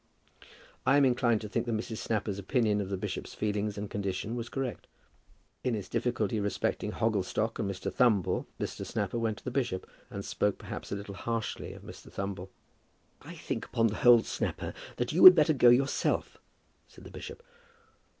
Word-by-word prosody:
I 135 - +4
am 140 - +5
inclined 120 -3 +2
to 105 - -5
think 105 - -2
that 115 - 0
Mrs. 110 0 -5
Snapper's 105 -2 -2
opinion 105 0 +1
of 95 - -5
the 100 - -2
bishop's - - -5
feelings 105 -1 -1
and 105 +1 -4
condition 100 +3 -3
was 115 -1 -4
correct. 135 -4 -4 0.8
In 125 -3 0
his 100 -3 -5
difficulty 115 -2 -1
respecting 100 0 -1
Hogglestock 110 +1 -1
and 100 - -1
Mr. 95 0 -4
Thumble 115 -7 +2
Mr. - - -4
Snapper 120 - -2
went 110 -2 -1
to - - -14
the 125 - -4
bishop, 120 -8 -2 0.2
and 100 0 -6
spoke 105 -1 0
perhaps - - -8
a - - -1
little 100 0 -7
harshly 115 +1 -4
of - - -13
Mr. - - -12
Thumble. 95 -1 -5 0.7
"I - - -10
think, - - -4
upon 115 - +1
the 105 - -4
whole, 120 -2 +7
Snapper, - - -3 0.2
that 120 +3 -2
you 175 - +3
had 185 -1 +13
better 155 -1 +4
go 125 -3 +6
yourself," 135 +3 +1 0.5
said - - -16
the - - -11
bishop. 475 - -9
110 Hz, 180 wpm, -30 LUFS, 100-120 Hz, 0.8 s, had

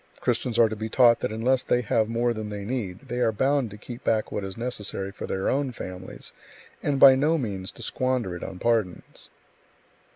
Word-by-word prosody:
Christians 120 -3 -1
are 115 - +6
to 110 - -4
be 110 +1 -5
taught 120 -1 +5
that - - -2
unless 125 +4 +1
they 125 -1 +1
have 110 -1 +1
more 120 +1 +1
than 110 -1 -5
they 100 -1 -5
need, 105 -6 -4
they 120 +1 -3
are 120 -2 +3
bound 130 +3 +1
to 105 - -10
keep 120 +3 -9
back 110 -1 0
what 100 - -3
is 95 -1 -5
necessary 105 -5 -4
for 100 - -7
their 95 0 -2
own 135 -1 0
families, 90 -5 -8 0.5
and 140 -2 0
by 135 -1 +10
no 150 +5 +2
means 100 -8 -4
to 120 - -10
squander 125 -7 -1
it 85 - -7
on 95 - -6
pardons. 110 -5 -1
115 Hz, 205 wpm, -26 LUFS, 100-125 Hz, 0.5 s, by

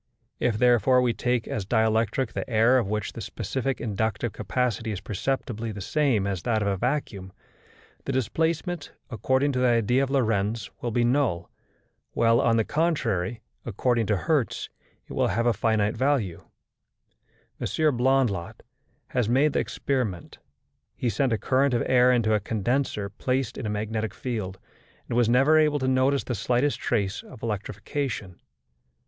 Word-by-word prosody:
If 115 -3 +1
therefore 125 +1 +4
we 120 -2 +2
take 120 -1 -1
as 105 - -3
dielectric 110 +3 +1
the - - -4
air 115 +3 +4
of 115 - -2
which 105 0 -3
the - - -7
specific 135 0 -3
inductive 110 +1 -2
capacity 110 +2 -1
is 100 - -4
perceptibly 115 +2 -3
the 105 - -7
same 115 0 +1
as 100 -3 -2
that 110 +2 0
of - - -1
a 100 - +1
vacuum, 105 -5 -2 0.7
the - - -2
displacement, 160 - -1 0.2
according 130 +4 +1
to 125 - -1
the 125 - +3
idea 120 +2 +3
of 135 - 0
Lorentz, 115 -5 0
will 120 - -2
be 120 +1 +1
null; 120 -9 +1 0.6
while, 115 0 +3
on 115 -1 +3
the 110 - +3
contrary, 120 - -1 0.2
according 115 0 0
to 105 - +2
Hertz, 145 - -1 0.4
it - - -10
will - - +1
have 115 +5 0
a 120 - +4
finite 110 0 +1
value. 125 - 0 1.1
M. - - -2 0.3
Blondlot 120 -8 0 0.5
has 125 -4 0
made 135 +5 +3
the - - +2
experiment. 120 -11 -3 0.6
He 125 - -1
sent 125 +5 0
a 110 - +2
current 130 +3 +2
of 120 - +1
air 125 0 +5
into 115 -3 +2
a 105 - +3
condenser 110 0 -1
placed 125 +4 -2
in 110 - -4
a - - -2
magnetic 110 0 -3
field, 105 -7 -4 0.5
and - - -3
was 120 -2 +3
never 135 +6 +5
able 150 -1 +3
to 130 -2 -1
notice 130 +2 +2
the 125 - -3
slightest 125 +4 0
trace 105 -3 -1
of 125 - -14
electrification. 105 -1 -4
115 Hz, 160 wpm, -26 LUFS, 105-130 Hz, 1.1 s, air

